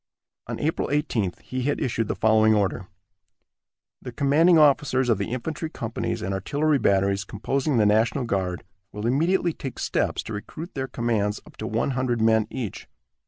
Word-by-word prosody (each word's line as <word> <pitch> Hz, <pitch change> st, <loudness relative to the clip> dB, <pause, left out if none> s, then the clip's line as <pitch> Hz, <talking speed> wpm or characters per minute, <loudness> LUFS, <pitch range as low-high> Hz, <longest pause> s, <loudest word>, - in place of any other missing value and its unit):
On -, -, -4 dB
April 155 Hz, +2 st, -1 dB
18th 125 Hz, -, -1 dB
he 130 Hz, 0 st, -4 dB
had 145 Hz, +3 st, 0 dB
issued 115 Hz, -3 st, -1 dB
the -, -, -2 dB
following 110 Hz, 0 st, +4 dB
order: 100 Hz, -2 st, -1 dB, 1.1 s
"The 125 Hz, -, -7 dB
commanding 150 Hz, +7 st, +4 dB
officers 140 Hz, -4 st, +3 dB
of 110 Hz, -4 st, +2 dB
the 100 Hz, -, -3 dB
infantry 155 Hz, +6 st, -4 dB
companies 115 Hz, -4 st, -4 dB
and 95 Hz, -, -2 dB
artillery 145 Hz, +9 st, +1 dB
batteries 100 Hz, -1 st, +2 dB
composing 135 Hz, +7 st, -1 dB
the 110 Hz, -, +4 dB
national 110 Hz, +6 st, +2 dB
guard 95 Hz, -6 st, -2 dB, 0.3 s
will 105 Hz, +1 st, -6 dB
immediately 165 Hz, +7 st, +2 dB
take 135 Hz, -3 st, -7 dB
steps -, -, -1 dB
to 110 Hz, -, -7 dB
recruit 155 Hz, -, -7 dB
their 135 Hz, -1 st, -3 dB
commands 110 Hz, -4 st, -1 dB
up -, -, -16 dB
to 110 Hz, -, -4 dB
one 115 Hz, +5 st, 0 dB
hundred 125 Hz, -2 st, -1 dB
men 110 Hz, -1 st, +3 dB
each. 120 Hz, -7 st, -6 dB
120 Hz, 165 wpm, -25 LUFS, 105-140 Hz, 1.1 s, following